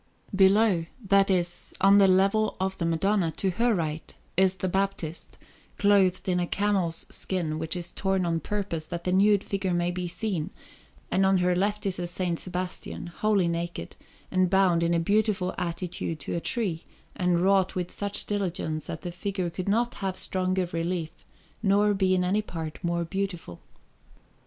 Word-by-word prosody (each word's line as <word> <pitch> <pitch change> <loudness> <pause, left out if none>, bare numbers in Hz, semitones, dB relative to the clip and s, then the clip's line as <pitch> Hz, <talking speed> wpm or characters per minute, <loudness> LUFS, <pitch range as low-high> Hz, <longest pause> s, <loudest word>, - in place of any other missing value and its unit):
Below 190 -3 +4 0.2
that 195 0 +5
is, 175 -2 0
on 195 +1 +6
the 195 - +6
level 195 +3 +3
of 190 0 -1
the 170 - 0
Madonna, 180 +2 +1
to 190 +3 -1
her 230 +5 +2
right 160 -2 -4 0.2
is 190 0 +3
the 190 - -2
Baptist, 190 -4 -2 0.4
clothed 195 -3 +3
in 180 -1 +1
a 175 - -1
camel's 190 -5 0
skin, 160 -5 -1
which 160 +2 -2
is 175 -1 -2
torn 190 -2 0
on 165 -1 0
purpose 180 -5 -3
that 170 -1 -5
the 180 - -1
nude 200 +1 +4
figure 190 -2 -1
may 175 0 +1
be 180 0 -3
seen; 180 -3 -2 0.6
and 190 +1 +3
on 190 0 +4
her 180 0 +2
left 205 +3 0
is 185 -2 0
a 175 -1 -2
S. 175 -1 -1
Sebastian, 180 0 -4
wholly 210 -4 +2
naked, 170 - -4 0.4
and 185 -1 +2
bound 185 -3 +3
in 170 0 +2
a - - +2
beautiful 200 0 +1
attitude 170 -2 -3
to - - -4
a - - 0
tree, 175 -4 -2 0.3
and 180 -1 +1
wrought 195 -1 +3
with 180 -1 -2
such 205 0 -2
diligence 175 -6 -2
that - - -6
the 175 - -4
figure 185 -1 -3
could 185 +3 -4
not 235 +4 +1
have 190 -1 -2
stronger 185 -1 0
relief 165 -1 -2 0.5
nor 205 0 +3
be 190 -1 +2
in 180 - +1
any 195 +4 +1
part 165 -5 -7
more 170 0 0
beautiful. 180 - -4
185 Hz, 175 wpm, -27 LUFS, 170-195 Hz, 0.6 s, on